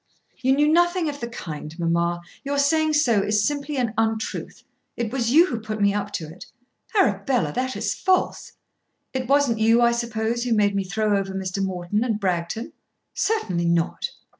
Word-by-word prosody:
"You 260 +1 +3
knew 295 +1 +3
nothing 345 +1 +3
of 285 -1 -6
the 235 - -4
kind, 160 -8 -7
mamma, 170 0 0
and - - -21
your 285 +1 -2
saying 310 +2 +2
so 245 -9 +3
is 210 +1 +1
simply 290 0 -2
an 240 -4 0
untruth. 220 0 -2 0.3
It 235 -2 -2
was 240 -4 0
you 320 +7 +6
who 240 -10 -3
put 215 0 -5
me 200 -1 +3
up 205 0 -2
to 160 - -3
it." 165 +4 -11 0.5
"Arabella, 205 - +2
that 260 0 -2
is - - -1
false." 375 -1 0 0.6
"It 260 -2 -2
wasn't 275 -4 +3
you, 225 +2 +4
I 235 - +5
suppose, 235 0 -1
who 245 -2 +1
made 205 -1 +3
me 195 -1 0
throw 210 +3 0
over 195 -1 -4
Mr. 190 0 -2
Morton 190 +3 -1
and 225 -4 -1
Bragton." 185 +4 -2 0.4
"Certainly 185 - 0
not." 170 0 0
225 Hz, 185 wpm, -23 LUFS, 195-270 Hz, 0.6 s, you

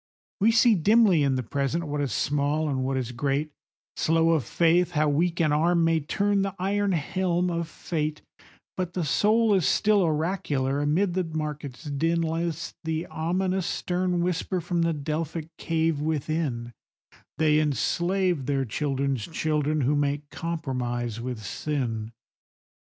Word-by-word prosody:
We 210 +3 +4
see 230 +1 +5
dimly 205 -1 +4
in 140 -2 +2
the 130 - -1
Present 140 +7 -1
what 145 -2 -3
is 140 -4 -1
small 145 +5 0
and 135 -3 -1
what 135 0 -1
is 125 -2 -3
great, 140 +4 -1 0.4
Slow 165 +1 +2
of 160 -5 +2
faith 175 +4 +2
how 155 -1 +2
weak 165 +4 +1
an 155 -3 +3
arm 170 +3 +3
may 165 0 +3
turn 200 +6 0
the 195 -1 -2
iron 200 +1 0
helm 180 +2 0
of 170 -1 -2
fate, 155 -2 -3 0.5
But 180 -2 -3
the 175 -3 -1
soul 215 +8 +3
is 185 -5 +2
still 210 -1 +3
oracular; 150 -5 0
amid 170 +6 +1
the 185 +1 0
market's 150 -4 -5
din, 165 +3 0
List 165 0 -3
the 160 +1 -2
ominous 185 +3 -1
stern 180 -1 -1
whisper 180 +1 -1
from 175 0 -1
the 165 0 +2
Delphic 155 +2 -4
cave 160 -2 0
within,— 150 -6 -2 0.6
'They 155 0 +4
enslave 170 - 0
their 135 -2 +1
children's 135 -1 -1
children 155 -2 0
who 140 +3 +2
make 145 0 -1
compromise 125 -8 -3
with 120 -3 -5
sin. 115 0 -3
160 Hz, 150 wpm, -26 LUFS, 145-175 Hz, 0.6 s, see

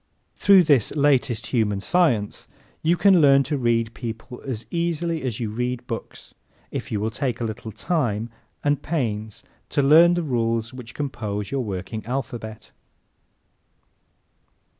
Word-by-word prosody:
Through 195 -2 +6
this 145 -8 +3
latest 140 -6 +2
human 105 -5 +1
science 120 - +1 0.3
you 170 +2 +2
can 190 -3 +5
learn 140 -1 +6
to 145 +2 -2
read 115 -3 +1
people 115 +1 -7
as 120 -5 -5
easily 170 -1 -1
as 125 -5 -3
you 110 -3 -2
read 125 +2 -3
books 115 -2 -7 0.4
if - - -5
you 105 - 0
will 110 +2 -1
take 125 -1 -2
the 115 - -3
little 110 0 -5
time 115 - -1 0.3
and 145 -1 +1
pains 110 -9 -3 0.3
to 145 - +1
learn 165 +5 +7
the 175 - -1
rules 115 -4 -1
which 125 -2 -10
compose 105 -8 -4
your 135 -2 -1
working 100 +1 -5
alphabet. 120 -4 -5
125 Hz, 140 wpm, -23 LUFS, 110-145 Hz, 0.4 s, learn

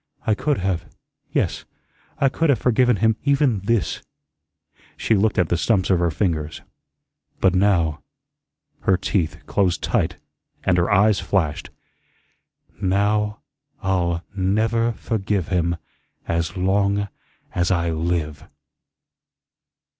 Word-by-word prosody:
I 110 - +3
could 145 +6 0
have 90 -3 -2 0.4
yes, - - 0 0.5
I 140 - +3
could 165 +4 0
have 140 - +4
forgiven 125 +1 +3
him 110 +2 +2
even 140 -6 +2
THIS" 105 +2 0 1.0
she - - +1
looked 105 +1 +2
at 90 -3 +2
the 85 - +2
stumps 95 0 +1
of 90 - +3
her 85 -1 +2
fingers. 80 -2 -2 0.8
"But 95 -2 +3
now," 90 -5 +2 0.8
her 95 - +2
teeth 85 -4 -2
closed 95 +1 0
tight - - 0 0.5
and 90 -2 +3
her 85 - +1
eyes 105 +1 +4
flashed, 85 -3 -1 1.1
"now 105 +2 +1 0.4
I'll 85 -3 0
never 110 +5 +1
forgive 100 -5 -2
him 85 -2 +1 0.5
as 85 +2 -1
long 100 +2 +1 0.5
as 85 -1 +1
I 85 -2 +1
live." 80 -2 -2
95 Hz, 115 wpm, -22 LUFS, 85-105 Hz, 1.1 s, have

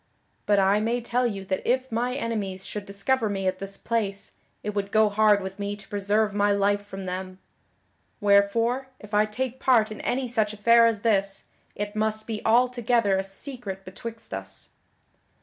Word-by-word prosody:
But 205 - +4
I 195 +1 +4
may 230 +3 0
tell 245 +1 0
you 195 -4 -5
that 190 0 -1
if 260 +1 0
my 245 +3 -1
enemies 205 -6 -3
should 205 -1 -5
discover 215 +4 0
me 195 -1 -2
at 185 0 0
this 195 0 -4
place, 205 -4 -2 0.3
it 210 - -3
would 200 -1 -2
go 215 -1 +4
hard 210 0 +4
with 190 +1 -7
me 200 0 -2
to 205 -1 -13
preserve 205 +1 +1
my 205 0 +2
life 200 0 +2
from 195 -1 -8
them. 185 0 -5 0.8
Wherefore, 230 +5 +3
if 210 -1 -13
I 210 +1 +4
take 255 +3 -3
part 230 -5 +3
in 215 - -7
any 255 +1 -1
such 220 -3 0
affair 230 +2 +5
as 220 -3 -1
this, 195 -3 +1 0.3
it 205 +1 -4
must 215 0 -1
be 220 -2 -4
altogether 240 -3 +3
a 190 - 0
secret 195 -1 -6
betwixt 225 - -8
us." 95 0 -7
210 Hz, 180 wpm, -26 LUFS, 195-230 Hz, 0.8 s, affair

